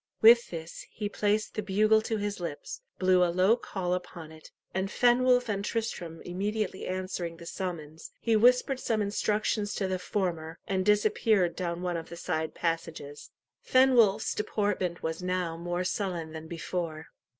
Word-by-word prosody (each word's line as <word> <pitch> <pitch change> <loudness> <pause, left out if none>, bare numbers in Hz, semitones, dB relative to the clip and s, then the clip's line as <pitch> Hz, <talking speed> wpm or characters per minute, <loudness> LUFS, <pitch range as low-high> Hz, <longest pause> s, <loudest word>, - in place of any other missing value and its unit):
With 235 +2 +7
this 160 -1 -7
he 210 -1 -4
placed 210 +1 0
the 215 - -2
bugle 215 +2 +3
to 220 0 -2
his 205 -1 -3
lips, 170 - -6 0.2
blew 185 -1 +4
a 175 - +3
low 185 +6 +4
call 185 -6 -3
upon 175 -3 -6
it, 160 0 -14 0.2
and 190 +1 -1
Fenwolf 245 +2 +4
and 200 -2 -2
Tristram 190 -8 -4
immediately 200 +2 -3
answering 185 -2 -3
the 170 - -11
summons, 165 -4 -6
he 230 -1 +2
whispered 250 +4 +4
some 220 -4 0
instructions 210 0 0
to 195 - -1
the 185 -1 -2
former, 175 -4 -2
and 190 -1 0
disappeared 210 -2 +3
down 175 -1 -3
one 175 -1 -1
of 165 - -7
the 170 - -8
side 160 -1 -2
passages. 165 -3 -4 0.3
Fenwolf's, 240 -6 +4
deportment 205 -4 -1
was 160 +2 -3
now 180 -2 -1
more 175 +2 -2
sullen 180 -4 -2
than 160 0 -7
before. 165 -1 -4
185 Hz, 160 wpm, -29 LUFS, 170-210 Hz, 0.3 s, With